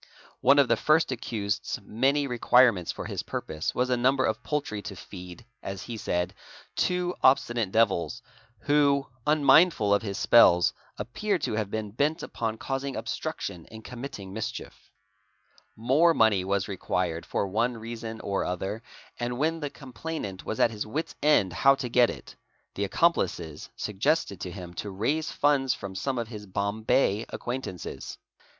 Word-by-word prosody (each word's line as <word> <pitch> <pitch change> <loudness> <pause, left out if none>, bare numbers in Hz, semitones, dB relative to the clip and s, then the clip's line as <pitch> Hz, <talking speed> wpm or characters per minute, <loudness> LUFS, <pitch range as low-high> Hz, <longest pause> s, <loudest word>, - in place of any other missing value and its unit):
One 140 - +5
of 140 -2 +5
the 115 - +3
first 155 +2 +3
accused's 105 -3 -3
many 135 +8 +1
requirements 120 -6 +4
for - - -7
his - - -3
purpose 80 0 -4
was 125 +1 +1
a - - +4
number 130 +2 +2
of 110 - -1
poultry 145 -9 -2
to 100 -1 -7
feed, 90 +2 -10 0.2
as 95 -1 -6
he 120 - -6
said, 90 -4 -2 0.4
two 180 0 0
obstinate 120 -5 +3
devils, 115 +1 +1 0.4
who, 140 -1 +3 0.2
unmindful 150 - +5
of 100 - +3
his 100 -3 -4
spells, 90 -7 +6 0.2
appeared 195 - -2
to - - -1
have 110 -2 -1
been 110 -1 -4
bent 150 +9 0
upon 115 -1 -3
causing. 135 +2 -3
obstruction 90 -4 -4
and 110 0 -11
committing 120 -6 -8
mischief, 110 +1 -6 0.9
More 145 +9 +3
money 105 -4 +4
was 100 0 0
required 90 -3 -2
for 100 - -2
one 115 +5 0
reason 115 0 -6
or 100 -1 -1
other, 95 +4 -3 0.4
and 120 0 -2
when 160 +4 0
the 145 -2 -3
com. 135 -2 -13
plainant 105 -7 -5
was 110 - -4
at 115 - +4
his 105 -2 -3
wit's 150 +10 -3
end 140 - +3
how 135 +9 +5
to 130 -3 -4
get 120 0 +5
it, - - -9 0.4
the 100 - -1
accomplices 90 - 0
suggested 105 - 0
t¢ 90 0 -5
him 90 -2 -8
to 100 +4 -5
raise 145 - -1
funds 140 -3 +2
from 100 -1 -7
some 130 +7 -2
of 115 -2 -3
his 105 -3 -8
Bombay 100 +3 0
acquaintances. 120 -8 -5
115 Hz, 160 wpm, -27 LUFS, 100-135 Hz, 0.9 s, spells